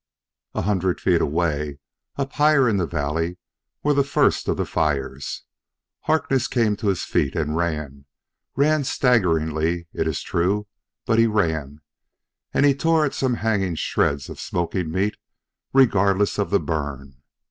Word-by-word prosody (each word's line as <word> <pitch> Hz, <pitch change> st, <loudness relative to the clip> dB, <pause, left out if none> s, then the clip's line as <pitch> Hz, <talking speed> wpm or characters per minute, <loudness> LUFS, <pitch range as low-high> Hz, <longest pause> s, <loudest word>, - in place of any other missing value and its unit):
A -, -, -1 dB
hundred 95 Hz, -2 st, 0 dB
feet 90 Hz, -3 st, +2 dB
away, 75 Hz, -2 st, -1 dB, 0.4 s
up 140 Hz, -1 st, -3 dB
higher 150 Hz, -3 st, +4 dB
in 110 Hz, -3 st, +2 dB
the 90 Hz, -3 st, 0 dB
valley, 80 Hz, +4 st, -2 dB, 0.5 s
were 145 Hz, -, +3 dB
the 140 Hz, 0 st, +3 dB
first 140 Hz, -, +1 dB
of -, -, 0 dB
the -, -, -1 dB
fires. 70 Hz, -2 st, -2 dB, 0.6 s
Harkness 150 Hz, -4 st, +1 dB
came 115 Hz, -4 st, +1 dB
to 110 Hz, -, -3 dB
his 95 Hz, -4 st, 0 dB
feet 70 Hz, -, 0 dB
and 75 Hz, -1 st, -1 dB
ran 75 Hz, -5 st, -3 dB, 0.5 s
ran 150 Hz, +1 st, +3 dB
staggeringly, 85 Hz, -, +1 dB
it 80 Hz, -, -1 dB
is 80 Hz, -, -2 dB
true, 100 Hz, +5 st, 0 dB, 0.4 s
but 115 Hz, -1 st, +2 dB
he 115 Hz, -, +5 dB
ran 80 Hz, -9 st, -1 dB, 0.7 s
and 145 Hz, -, +3 dB
he 140 Hz, -, +5 dB
tore 160 Hz, +2 st, +2 dB
at 145 Hz, -, -2 dB
some 130 Hz, -2 st, 0 dB
hanging 100 Hz, -6 st, 0 dB
shreds 70 Hz, -2 st, 0 dB
of -, -, -9 dB
smoking 85 Hz, 0 st, -2 dB
meat 95 Hz, +6 st, -1 dB, 0.5 s
regardless 100 Hz, -6 st, +3 dB
of 100 Hz, -, 0 dB
the 100 Hz, -, +3 dB
burn. 70 Hz, -4 st, -5 dB
90 Hz, 150 wpm, -23 LUFS, 80-115 Hz, 0.7 s, he